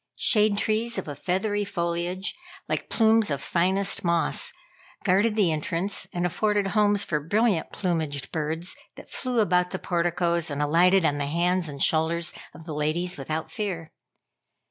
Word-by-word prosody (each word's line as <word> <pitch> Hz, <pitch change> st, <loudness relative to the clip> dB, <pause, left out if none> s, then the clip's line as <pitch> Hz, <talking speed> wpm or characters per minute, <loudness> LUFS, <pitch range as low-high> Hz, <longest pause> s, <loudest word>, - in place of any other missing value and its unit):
Shade 210 Hz, -2 st, +4 dB
trees 225 Hz, +3 st, 0 dB
of -, -, -4 dB
a 145 Hz, -, -4 dB
feathery 200 Hz, +6 st, -1 dB
foliage, 175 Hz, 0 st, -2 dB, 0.3 s
like -, -, -3 dB
plumes 225 Hz, -1 st, +4 dB
of 140 Hz, -2 st, -1 dB
finest 190 Hz, +3 st, 0 dB
moss, 170 Hz, -1 st, +1 dB, 0.5 s
guarded 205 Hz, +3 st, +3 dB
the 200 Hz, -6 st, +3 dB
entrance 165 Hz, +5 st, -1 dB
and 175 Hz, 0 st, -1 dB
afforded 205 Hz, +3 st, 0 dB
homes 205 Hz, -1 st, +3 dB
for 155 Hz, -5 st, -1 dB
brilliant 200 Hz, +3 st, +1 dB
plumaged 160 Hz, -7 st, -2 dB
birds 160 Hz, +3 st, -3 dB, 0.2 s
that -, -, -13 dB
flew 250 Hz, -3 st, +1 dB
about 180 Hz, -2 st, +2 dB
the 190 Hz, -, -3 dB
porticos 170 Hz, -1 st, 0 dB
and 145 Hz, -1 st, -4 dB
alighted 170 Hz, +5 st, +4 dB
on 145 Hz, -1 st, +1 dB
the 140 Hz, -, -1 dB
hands 175 Hz, +2 st, +1 dB
and 140 Hz, -1 st, -2 dB
shoulders 165 Hz, +2 st, +2 dB, 0.2 s
of 160 Hz, -, -12 dB
the 160 Hz, -, -5 dB
ladies 155 Hz, +4 st, 0 dB
without 155 Hz, +4 st, -4 dB
fear. 180 Hz, -7 st, -4 dB
175 Hz, 155 wpm, -26 LUFS, 160-200 Hz, 0.5 s, Shade